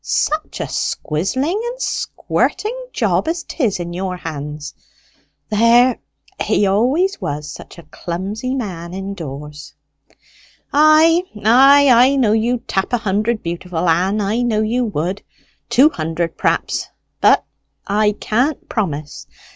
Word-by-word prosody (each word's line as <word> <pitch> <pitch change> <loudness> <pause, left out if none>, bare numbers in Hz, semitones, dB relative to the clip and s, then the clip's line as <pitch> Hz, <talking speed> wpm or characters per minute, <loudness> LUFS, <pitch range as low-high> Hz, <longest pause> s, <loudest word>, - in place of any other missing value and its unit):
Such 310 +1 -1
a - - -3
squizzling 260 - -2
and 485 +1 -5
squirting 450 -2 -1 0.2
job - - 0
as 335 +2 -2
'tis 230 - -1
in 175 0 -5
your 185 0 -3
hands! 150 -2 -6 0.8
There, 235 +3 +4 0.4
he 205 - +2
always 265 - +1
was 145 0 -4
such - - -11
a 170 - -11
clumsy 195 - -4
man 180 -8 -5
indoors." 150 -7 -7 1.0
"Ay, 310 +3 +5 0.2
ay; 275 +5 +7
I 250 +3 +5
know 245 -6 +2
you'd 230 +2 0
tap 190 +5 -1
a - - +4
hundred 215 +1 -1
beautiful, 170 0 -3
Ann 185 +6 +2
I 210 +4 0
know 225 -3 +1
you 240 +3 0
would; 190 0 -3 0.5
two 285 +5 +5
hundred, 165 - -3
perhaps. - - -1 0.3
But - - +4 0.4
I 210 +1 +2
can't 250 +8 -1
promise. 155 -9 -4
210 Hz, 125 wpm, -18 LUFS, 170-255 Hz, 1.0 s, ay